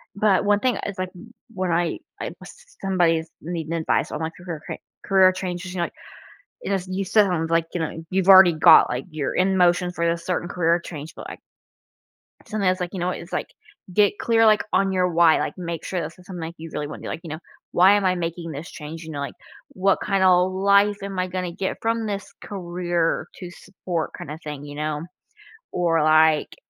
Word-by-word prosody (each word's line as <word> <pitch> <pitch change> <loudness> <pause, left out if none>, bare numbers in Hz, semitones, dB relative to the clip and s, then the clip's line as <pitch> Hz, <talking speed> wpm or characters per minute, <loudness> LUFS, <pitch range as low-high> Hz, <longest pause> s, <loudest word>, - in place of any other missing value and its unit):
But 200 -1 +3
1 205 0 +3
thing, 255 +1 +1
uh, - - -4
is, 200 -1 -6
like, 185 0 -3
w 210 +6 -13 0.2
when 185 -2 -2
I 170 -1 0 0.2
I - - -4
s 485 +1 -15
somebody's 165 -4 +1
needing 165 -1 -5
advice 165 -1 0
on, 150 - -4
like, 160 0 -3
career 175 -4 -7
ca - - -5 0.3
career 190 -1 +5
changes, 185 0 -5
you - - -5
know, - - +2
like, - - -7 0.7
you - - -4
know 200 - +2
s 185 -1 -6
you 190 +1 -2
still 210 +2 +4
haven't, 165 -2 -1
like, 165 0 +2
you 175 - -1
know, 160 0 -4
you've 190 0 0
already 190 -2 +9
got, 155 - +7
like 125 +2 -3
you're 155 -3 -3
in 190 +1 +2
motion 180 0 +3
for 170 -1 -1
this 170 0 -2
certain 180 -1 -1
career 170 -1 +1
change, 155 -2 -8
but, - - -9
like - - -8 1.1
sometimes, 190 -3 0
like, 175 0 -2
you 190 - -5
know, 180 +1 0
it's, - - -7
like, - - -2 0.4
get 205 +1 +3
clear, 225 -1 +3
like, 215 -1 +5
on 195 -1 +2
your 180 -1 +2
why. 170 -1 +4
Like, - - -3
make 170 -2 -5
sure 185 - -2
this 160 +4 -7
is 180 - -17
something, 180 -3 -7
like, 165 +1 -5
you 165 0 -8
really 150 -1 -3
wanna 150 - -8
be, - - -7
like, - - -5
you 160 - -8
know, 155 - -5 0.3
"Why 185 +3 +6
am 205 -1 +1
I 185 -1 +3
making 170 -1 -4
this 145 +5 -7
change?" 160 +2 -8
You 160 - -8
know? 145 - -4
Like, 140 -3 -5 0.4
"What 190 +1 +1
kinda 195 -2 +3
life 200 +3 +3
am 195 -1 -5
I 185 - 0
gonna 180 -1 -3
get 190 +2 -3
from 225 0 0
this 200 -1 -5
career 175 -3 -2
to 180 -2 -8
support 175 -2 -5
kinda 150 +2 -7
thing?" 150 -1 -6
You 145 0 -9
know? 150 0 -2 0.7
Or, 165 -3 +1
like, 155 0 +4
180 Hz, 225 wpm, -23 LUFS, 165-190 Hz, 1.1 s, already